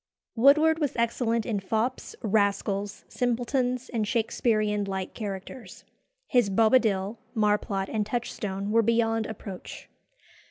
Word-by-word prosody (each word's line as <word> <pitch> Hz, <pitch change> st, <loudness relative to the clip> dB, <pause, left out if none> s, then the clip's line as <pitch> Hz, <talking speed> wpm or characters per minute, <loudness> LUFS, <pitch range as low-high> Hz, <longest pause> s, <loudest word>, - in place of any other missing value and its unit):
Woodward 305 Hz, +6 st, +5 dB
was 290 Hz, -4 st, -1 dB
excellent 230 Hz, -1 st, 0 dB
in 220 Hz, -5 st, -1 dB
fops, 220 Hz, +6 st, -2 dB
rascals, 200 Hz, -1 st, 0 dB
simpletons, 245 Hz, +1 st, -1 dB
and 225 Hz, -3 st, -1 dB
Shakesperean 215 Hz, -2 st, 0 dB
light 190 Hz, -1 st, -4 dB
characters. 205 Hz, +3 st, -7 dB, 0.4 s
His 245 Hz, -6 st, +2 dB
Bobadil, 215 Hz, -1 st, +2 dB, 0.2 s
Marplot, 210 Hz, -2 st, +1 dB
and 215 Hz, 0 st, -1 dB
Touchstone 210 Hz, -3 st, -3 dB
were 230 Hz, +1 st, +5 dB
beyond 225 Hz, 0 st, +1 dB
approach. 200 Hz, -4 st, -8 dB
220 Hz, 110 wpm, -27 LUFS, 205-240 Hz, 0.4 s, Woodward